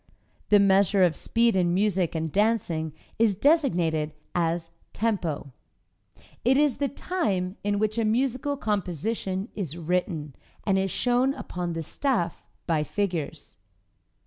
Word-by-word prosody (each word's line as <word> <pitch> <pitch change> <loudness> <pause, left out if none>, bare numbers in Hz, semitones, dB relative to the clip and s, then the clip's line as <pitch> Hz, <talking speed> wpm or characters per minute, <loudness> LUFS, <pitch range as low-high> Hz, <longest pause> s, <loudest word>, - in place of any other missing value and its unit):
The 210 - +7
measure 200 0 +4
of 170 -3 +3
speed 230 +4 +2
in 175 -2 +2
music 190 -4 +1
and 160 -1 -2
dancing 190 -7 +1 0.3
is 220 -3 +4
designated 175 - +2 0.2
as 165 -1 -1 0.2
"tempo." 175 -11 -1 0.9
It 260 +3 +4
is 290 -4 +3
the 280 - +1
"time" 205 - -2
in 205 0 +1
which 215 +2 0
a - - +2
musical 255 +5 0
composition 195 - -2
is 175 -6 -4
written, 170 -3 -2 0.3
and 195 -2 +3
is 190 0 0
shown 250 +6 +1
upon 175 -1 -4
the 165 0 -3
"staff" 175 - -1 0.2
by 160 -3 +1
figures. 160 - -3
195 Hz, 130 wpm, -26 LUFS, 170-230 Hz, 0.9 s, The